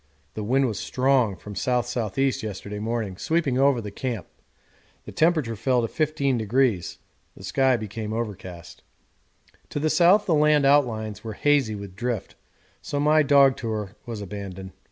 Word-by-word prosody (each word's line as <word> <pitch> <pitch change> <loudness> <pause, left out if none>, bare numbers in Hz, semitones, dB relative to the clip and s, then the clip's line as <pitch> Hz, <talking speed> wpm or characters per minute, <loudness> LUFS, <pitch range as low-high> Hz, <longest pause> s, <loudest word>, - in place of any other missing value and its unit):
The 110 - -5
wind 135 +5 +2
was 110 -6 -2
strong 130 -5 +1
from 105 +2 -10
the 95 - -4
S.S.E. 125 +1 0 0.2
yesterday 105 0 -6
morning, 110 -3 -3
sweeping 155 - 0
over 135 -2 +4
the 105 -3 -6
camp; 115 -2 -4 0.8
the - - -8
temperature 155 -8 +1
fell 120 +3 +1
to - - 0
15°, 130 - 0 0.4
the - - -12
sky 130 +6 +2
became 110 0 -5
overcast. 95 -7 -6 0.9
To - - -3
the 155 +1 +1
south 185 +4 +5
the 175 - +1
land 150 -1 +4
outlines 115 -7 +1
were 110 -1 -5
hazy 135 -3 +2
with 100 -2 -9
drift, 115 -2 -3 0.5
so 145 - -3
my 155 +2 +4
dog 140 -2 +5
tour 110 -4 -4
was 115 -3 -5
abandoned. 95 -1 -7
120 Hz, 155 wpm, -24 LUFS, 105-140 Hz, 0.9 s, south